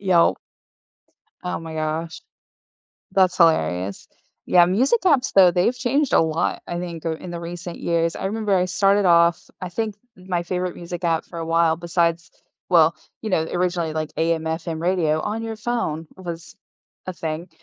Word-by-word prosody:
Yelp. 185 -4 +3 1.1
Oh 180 - -3
my 165 -1 -8
gosh. 160 +1 -3 0.9
That's 185 -2 +3
hilarious. 95 - +2 0.4
Yeah, 175 -1 +6
music 250 - +2
apps 285 -8 +3
though, 185 -3 +7
they've 185 +8 +1
changed 265 +4 0
a - - +6
lot, 160 0 -1
I 175 - -3
think, 170 -2 -6
uh, 165 - 0
in 175 +2 -9
the 170 - -5
recent 170 0 -7
years, 165 -1 0
I - - -5
remember 210 0 -1
I 180 -1 +2
started 195 +3 +2
off 170 -1 +4
I 185 - -4
think 215 +3 -3 0.2
my 180 -2 -3
favorite 180 0 -3
music 175 +1 -7
app 165 -1 +1
for 170 - -8
a 165 - -4
while 165 0 +3
besides 170 -1 0 0.4
well, 165 -2 +5 0.3
you 220 - -4
know, 165 -5 +2
originally 175 -3 -1
like 155 -1 -3
AM/FM 160 0 -1
radio 170 -4 +1
on 215 +5 -3
your 225 0 -4
phone 215 -9 -3
was 170 -3 -8 0.5
a 185 - -4
thing. 165 +1 -5
175 Hz, 165 wpm, -22 LUFS, 165-185 Hz, 1.1 s, though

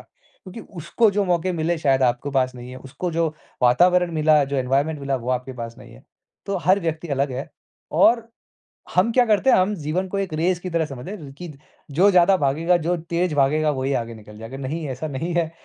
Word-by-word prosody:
क्योंकि 230 - -14
उसको 200 +5 0
जो 200 0 0
मौके 180 0 0
मिले 165 0 -1
शायद 135 -3 +2
आपको 125 +3 +1
पास 130 -2 0
नहीं 125 0 -9
है। 130 - -9
उसको 135 +7 -5
जो 165 0 +1 0.3
वातावरण 175 +8 +4
मिला 155 -1 +4
जो 140 +1 -3
एनवायरमेंट 140 +4 0
मिला 140 -1 -1
वो 125 0 -4
आपके 125 +1 -2
पास 115 0 -7
नहीं - - -14
है। - - -17 0.4
तो 200 - -1
हर 190 +4 +4
व्यक्ति 165 -1 -3
अलग 140 -1 -1
है 130 +3 -5 0.5
और 230 -1 +4 0.7
हम 190 +6 +3
क्या 250 +1 +4
करते 220 +4 +2
हैं - - +6
हम 190 +3 +2
जीवन 180 +6 -1
को 200 - -4
एक 190 -5 -3
रेस 175 +3 0
की 185 - -6
तरह 165 -2 0
समझते 135 +4 -8
हैं 210 - -6
र - - -10
कि 180 - -7
द 140 - -12 0.3
जो 180 +8 +4
ज़्यादा 185 +1 +5
भागेगा 160 +5 +1
जो 175 +2 -1
तेज़ 170 0 -2
भागेगा 150 +2 +2
वही 135 0 -2
आगे 115 -2 -2
निकल 105 -1 -13
जाएगा। 115 +4 -8
नहीं 150 +4 -4
ऐसा 135 +4 -4
नहीं 160 +5 -4
है। 165 -2 0
160 Hz, 220 wpm, -22 LUFS, 135-180 Hz, 0.7 s, हैं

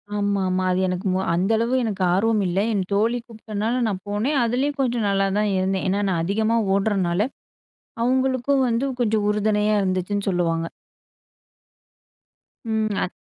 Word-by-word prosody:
ஆமா 200 -1 0 0.2
மா. 185 - 0
அது 180 - +1
எனக்கு 180 +2 -2
மொ 185 - +1 0.2
அந்த 185 +5 +1
அளவு 230 +3 0
எனக்கு 200 -4 -2
ஆர்வமில்ல. 195 -2 +1
என் 200 -2 0
தோழி 225 +4 +2
கூப்டனால 220 +2 -3
நான் 190 -3 -3
போனேன். 220 +8 0
அதிலயும் 265 +5 0
கொஞ்சம் 240 -4 0
நல்லா 195 0 +2
தான் 210 0 +1
இருந்தேன். 190 +1 0
ஏன்னா, 200 +2 +1
நான் 170 -3 0
அதிகமா 220 +5 +1 0.2
ஓடுறனால, 195 0 +1 0.7
அவுங்களுக்கும் 260 +2 +1
வந்து 235 +3 0 0.2
கொஞ்சம் 215 -2 +1
உறுதுணையா 210 0 +1
இருந்துச்சுன்னு 190 +2 -1
சொல்லுவாங்க. 165 -2 0 2.0
ம் 220 -2 -1
அ - - 0
210 Hz, 140 wpm, -23 LUFS, 190-230 Hz, 2.0 s, தோழி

